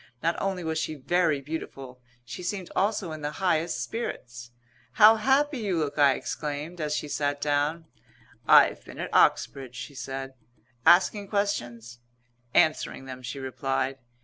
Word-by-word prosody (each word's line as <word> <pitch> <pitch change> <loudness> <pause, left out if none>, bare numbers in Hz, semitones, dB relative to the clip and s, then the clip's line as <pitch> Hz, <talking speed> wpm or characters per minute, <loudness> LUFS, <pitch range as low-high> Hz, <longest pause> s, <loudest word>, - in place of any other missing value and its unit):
Not 170 +1 +1
only 190 -2 -2
was 160 -1 -1
she 155 0 -3
very 155 0 +1
beautiful; 135 -4 -7 0.2
she 150 - -7
seemed 185 0 -4
also 200 -3 0
in 155 -1 -7
the 150 +1 -3
highest 165 -7 0
spirits. 125 - -6 0.4
"How 220 +1 +7
happy 270 +4 +2
you 200 -6 -1
look!" 150 -2 -2
I 140 -2 +6
exclaimed, 150 +3 -5
as 150 -1 -1
she 150 - -3
sat 145 0 -1
down. 150 +3 0 0.6
"I've - - +6
been - - -12
at - - -5
Oxbridge," 130 -3 +2
she 140 - -7
said. 135 0 -6 0.5
"Asking 200 +3 +5
questions?" 120 - -3 0.5
"Answering 155 -3 +2
them," 130 -1 -8
she 125 +3 -6
replied. 135 0 -2
150 Hz, 150 wpm, -27 LUFS, 135-180 Hz, 0.6 s, How